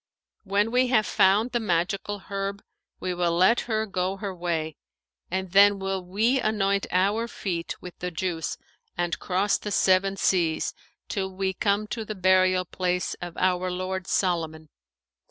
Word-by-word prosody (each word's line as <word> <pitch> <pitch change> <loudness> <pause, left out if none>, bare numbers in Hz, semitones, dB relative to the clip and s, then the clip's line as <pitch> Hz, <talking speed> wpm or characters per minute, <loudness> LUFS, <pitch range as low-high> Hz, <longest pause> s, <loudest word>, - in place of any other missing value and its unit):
When 205 +3 +1
we 250 +1 +3
have 230 -4 +3
found 205 +6 +3
the 240 - +1
magical 195 +1 -1
herb, 200 0 -3 0.4
we 185 - -2
will 175 -1 0
let 185 +7 +4
her 220 -1 +1
go 190 -1 -2
her 200 -2 -4
way; 165 -3 -2 0.5
and 190 0 -3
then 200 +1 +6
will 195 -1 -3
we 220 +9 +1
anoint 200 -3 +1
our 200 +6 +2
feet 175 -7 -4
with 180 - -10
the 180 - -3
juice 165 -1 -3 0.4
and 175 0 -1
cross 195 +2 +1
the 210 - -5
Seven 195 0 +3
Seas, 170 -5 +1 0.3
till 190 -2 -2
we 190 0 -2
come 200 +2 +1
to 225 - -3
the 215 0 -6
burial 185 -1 +3
place 180 0 -1
of 175 -1 -7
our 185 0 +1
lord 185 +1 -3
Solomon. 160 -4 -1
190 Hz, 155 wpm, -26 LUFS, 180-200 Hz, 0.5 s, then